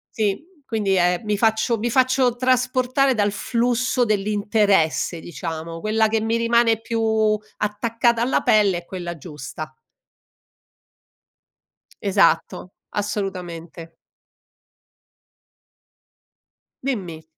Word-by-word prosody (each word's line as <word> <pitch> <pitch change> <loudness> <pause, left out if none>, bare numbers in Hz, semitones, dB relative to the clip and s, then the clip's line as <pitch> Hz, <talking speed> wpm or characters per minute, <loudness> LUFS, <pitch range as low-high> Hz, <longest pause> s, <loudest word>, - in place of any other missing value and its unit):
Sì, 210 +5 -1 0.2
quindi 215 -6 -1
è 180 -1 +2
mi 210 -1 -1
faccio 225 +1 +2
mi 235 +3 -1
faccio 255 0 +2
trasportare 255 +1 +2
dal 205 -2 +1
flusso 245 +3 0
dell'interesse, 205 -5 +1
diciamo. 165 +1 -6
Quella 220 +3 +2
che 220 0 0
mi 225 +1 0
rimane 230 -1 +3
più 220 -2 +1 0.2
attaccata 230 +3 0
alla 250 +3 +1
pelle 205 -4 +3
è 175 - -8
quella 175 -2 -6
giusta. 155 +1 -8 2.3
Esatto, 190 -2 +1 0.2
assolutamente. 175 -5 -5 2.9
Dimmi. 180 -12 -3
215 Hz, 90 wpm, -22 LUFS, 180-235 Hz, 2.9 s, rimane